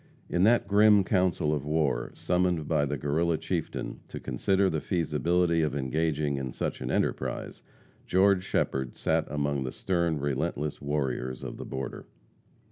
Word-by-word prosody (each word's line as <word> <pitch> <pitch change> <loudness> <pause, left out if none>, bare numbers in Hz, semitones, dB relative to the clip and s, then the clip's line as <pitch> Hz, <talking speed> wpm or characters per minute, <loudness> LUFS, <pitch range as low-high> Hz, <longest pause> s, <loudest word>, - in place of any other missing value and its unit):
In 90 - +1
that 120 -1 +4
grim 105 0 +6
council 90 -6 +1
of 75 -3 -2
war, 75 -2 0
summoned 90 -4 0
by 75 -3 +2
the 75 +1 -2
Guerrilla 80 +5 +1
chieftain - - -3
to - - -7
consider 95 0 +1
the 80 -4 -1
feasibility 85 0 +1
of 75 -3 0
engaging 75 +1 0
in 65 -2 -4
such - - -3
an - - -3
enterprise, - - -2 0.5
George 95 0 +4
Shepherd 65 -8 -1
sat - - +1
among 70 -1 -1
the 65 - -4
stern, 85 -4 0
relentless 75 +1 -2
warriors 65 -3 -2
of - - -6
the - - -7
border. 65 -1 -6
75 Hz, 150 wpm, -28 LUFS, 70-90 Hz, 0.5 s, grim